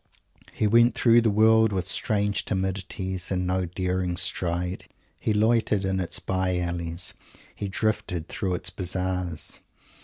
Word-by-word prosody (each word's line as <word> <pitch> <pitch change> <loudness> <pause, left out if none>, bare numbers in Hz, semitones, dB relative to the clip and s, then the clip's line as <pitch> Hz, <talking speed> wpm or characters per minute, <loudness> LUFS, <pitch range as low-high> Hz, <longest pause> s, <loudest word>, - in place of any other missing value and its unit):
He - - -1
went 115 +3 +5
through 120 0 +5
the 115 - +3
world 110 +1 +5
with 95 -3 -1
strange 100 +3 0
timidities 95 -1 -3
and 90 -1 0
no 90 0 0
daring 90 0 -2
stride. 90 0 -1 0.3
He - - 0
loitered 110 -2 +2
in 95 0 0
its 90 -1 -2
by 95 0 -1
alleys. 85 0 -3 0.4
He 100 - -4
drifted 95 -4 -1
through 95 -2 -2
its 90 +1 -1
Bazaars. 90 -2 -2
95 Hz, 140 wpm, -26 LUFS, 90-105 Hz, 0.4 s, went